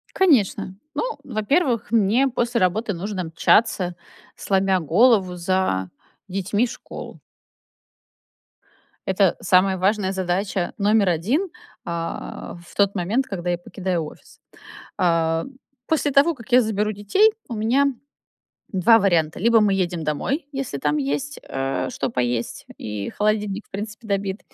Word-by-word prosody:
Конечно. 250 - +2 0.2
Ну, 470 +10 -2
во-первых, 235 - 0
мне 230 +5 +3
после 240 -2 -1
работы 205 +4 +1
нужно 185 0 -4
мчаться 180 +1 +2 0.4
сломя 190 -1 +1
голову 185 - +3
за 175 - 0 0.4
детьми 200 +5 0
в - - -8
школу. - - -9 1.9
Это 190 -1 +3
самая 190 +1 +3
важная 195 +1 +1
задача 190 0 -1
номер 205 -1 +3
1, 240 - 0 0.4
а, 170 0 -5
в - - -17
тот 200 0 +2
момент, 210 +9 0
когда 175 -2 -3
я 175 - 0
покидаю 180 -1 -3
офис. 150 - -12 0.6
А, 165 -2 +2 0.4
после 305 -2 +1
того 285 +5 +4
как 240 -2 -14
я 250 +1 +7
заберу 215 -1 0
детей, 215 - +3 0.2
у - - -6
меня 230 +6 +2 0.9
2 210 +5 +5
варианта: 170 -6 +1
либо 230 +2 +4
мы 200 -2 +3
едем 175 -3 -1
домой, 275 - -2
если 270 - -4
там 150 +2 0
есть, 145 0 -2
э, 135 0 -2
что - - -3
поесть 120 -1 -2
и 105 -2 -5
холодильник 210 -1 -1
в - - -36
принципе 215 +3 -7
добит. 200 0 -1
195 Hz, 130 wpm, -22 LUFS, 175-225 Hz, 1.9 s, я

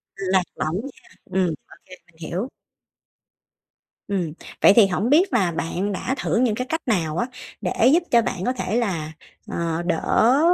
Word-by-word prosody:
Lạc 190 -1 +1
lỏng 155 +2 -2
nha, 275 - -11 0.2
ừm, 185 -1 0 0.2
ô - - -16
kê, 185 - -14
mình 175 - -26
hiểu. 195 +10 -3 1.6
Ừm, 180 -6 -2 0.3
vậy - - +8
thì 220 -4 +7
hổng 195 +5 -1
biết 335 +3 +4
là 190 -8 +2
bạn 175 +5 -2
đã 255 +7 -2
thử - - -1
những 235 -3 +2
cái 250 +3 -3
cách 320 0 -1
nào 170 -8 0
á, 240 - 0 0.3
để 230 - +2
giúp 345 +1 +4
cho 235 - +6
bạn 185 -4 -3
có 250 - +1
thể 220 -4 -3
là, 170 -10 -1 0.4
ờ, 170 0 -1
đỡ, 220 - +3
195 Hz, 175 wpm, -23 LUFS, 175-245 Hz, 1.6 s, vậy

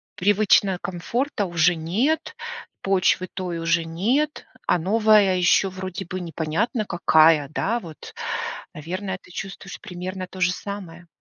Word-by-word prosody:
привычно 200 -1 +3
комфорта 215 +6 -2
уже 170 -1 +3
нет, 210 - 0 0.5
почвы 185 -1 +2
той 180 -3 -3
уже 165 0 +2
нет, 240 - 0 0.2
а 180 - +3
новая 210 +1 +4
ещё 180 +2 +4
вроде 185 0 -6
бы 185 +2 -5
непонятно 170 - -1
какая, 160 -4 +4
да, 225 +9 -1
вот. 160 -4 -11 0.6
Наверное, 185 +5 -4
ты - - -18
чувствуешь 195 +1 -7
примерно 185 -1 -6
то 185 - -10
же 180 0 +3
самое? 180 -4 -7
185 Hz, 130 wpm, -24 LUFS, 170-205 Hz, 0.6 s, новая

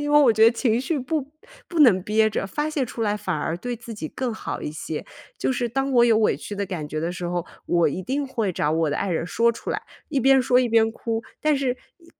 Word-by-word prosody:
因 290 0 -2
为 295 - +7
我 245 -5 +6
觉 220 +1 +2
得 230 - +8
情 235 -1 +1
绪 290 +3 -1
不 280 +3 -1 0.5
不 340 - -3
能 195 -10 +6
憋 220 +2 +2
着， 195 - -2
发 295 +9 -2
泄 285 -4 0
出 230 -1 -5
来 205 -1 +1
反 185 -5 -2
而 160 +2 -2
对 245 +6 -4
自 230 0 -9
己 155 -7 -5
更 255 -3 -3
好 220 - -5
一 - - -3
些。 155 0 -5 0.3
就 - - 0
是 245 -1 -1
当 270 +4 -1
我 240 -1 +6
有 230 -2 +4
委 215 - +3
屈 205 - -7
的 200 - -1
感 170 -6 -5
觉 155 - -4
的 170 +3 -2
时 180 -1 -6
候， 175 -1 -2 0.2
我 170 -1 +3
一 180 +6 -4
定 275 +7 -2
会 230 -7 -1
找 150 -2 0
我 160 -1 +1
的 - - -1
爱 200 - -1
人 165 0 -1
说 235 +5 +2
出 - - -9
来， - - -2 0.3
一 285 -3 0
边 265 +1 +5
说 250 0 +3
一 255 - +3
边 225 0 +4
哭。 225 0 -3 0.2
但 305 -2 +2
是 270 -2 0 0.3
呃 335 - -21
230 Hz, 290 characters per minute, -24 LUFS, 185-260 Hz, 0.5 s, 得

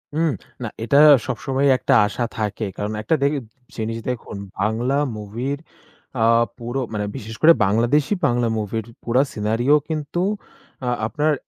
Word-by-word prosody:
হু, - - 0 0.4
না - - -2 0.2
এটা 140 +5 +3 0.3
সবসময় 135 +1 -1
একটা - - +1
আশা 120 - -3
থাকে। 110 0 -2
কারণ 105 +1 -3
একটা 135 +9 +1
দেইব 140 -2 +1 0.3
জিনিস 115 +1 -2
দেখুন 115 -4 -5 0.2
বাংলা 115 +6 0 0.2
মুভির 120 +7 -4 0.6
আ - - +4 0.3
পুরো, 120 +2 -4
মানে 105 -1 -1
বিশেষ 110 +1 -7
করে 165 +1 +8
বাংলাদেশী 120 - +2
বাংলা 120 0 +1
মুভির 110 +1 -3 0.2
পুরা 125 +3 +3
scenario 115 +6 +1 0.2
কিন্তু 155 +1 -3 0.7
আ - - -2 0.2
আপনার 150 +5 +1
120 Hz, 140 wpm, -22 LUFS, 110-140 Hz, 0.7 s, করে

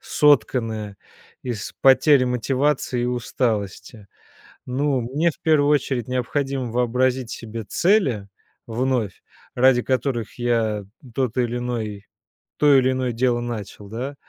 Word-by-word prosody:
сотканная 115 -7 +1 0.5
из 115 -4 -5
потери 135 0 +5
мотивации 130 +1 0
и - - 0
усталости. 115 -3 -3 0.6
Ну, 135 0 0
мне 150 +8 0
в - - -21
первую 150 -3 +3
очередь 130 -5 0
необходимо 130 0 -2
вообразить 125 0 0
себе 115 -1 -6
цели, 130 - +1 0.4
вновь, 120 -4 -1 0.3
ради 125 0 +4
которых 125 -4 -2
я 115 -3 0 0.3
тот 130 -3 -1
или 120 -1 0
иной 110 -5 -4 0.5
то 145 -1 +5
или 130 0 +3
иное 130 -2 -1
дело 120 0 +1
начал, 110 -4 -6
да. 125 +7 -5
125 Hz, 120 wpm, -22 LUFS, 115-130 Hz, 0.6 s, потери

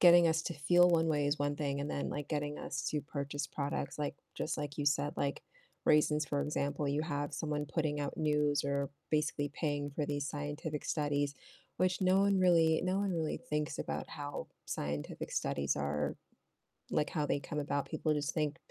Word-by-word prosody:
getting 175 -1 +8
us 160 0 +2
to 170 - -3
feel 175 +5 +5
one 165 -1 +4
way 145 -2 +2
is 145 +1 +1
one 145 0 +1
thing, 140 -2 -1
and 145 - -2
then, 140 - -1
like, 145 -1 -4
getting 150 -1 -2
us - - -3
to 150 - 0
purchase 145 -1 -3
products, 140 -1 -3
like 145 - -1 0.2
just 155 - -2
like 145 0 -4
you 145 - 0
said, 145 +1 +2
like 140 0 -1 0.4
raisins, 150 0 +4
for 140 +1 0
example, 145 -1 -1
you 145 +2 +1
have 145 -2 -2
someone 150 -1 -2
putting 150 -1 -1
out 145 - -3
news 150 -2 +2
or 140 0 0 0.2
basically 150 -2 +1
paying 145 -2 -1
for 150 - 0
these 145 -1 -1
scientific 150 +1 -4
studies, 145 -2 0 0.4
which 185 0 +2
no 185 +1 +4
one 200 -1 +4
really 165 -3 +5
no 185 +1 +1
one 200 -1 +1
really 160 -2 -1
thinks 150 +1 -1
about - - -3
how 145 -1 -5 0.2
scientific 75 0 -3
studies 70 0 0
are, 75 0 -1 0.7
like, 150 - +1
how 150 -3 0
they 145 - +1
come 150 +2 -3
about, 140 -1 -1
people 155 - 0
just 145 -2 -1
think 155 -1 0
150 Hz, 190 wpm, -34 LUFS, 145-160 Hz, 0.7 s, getting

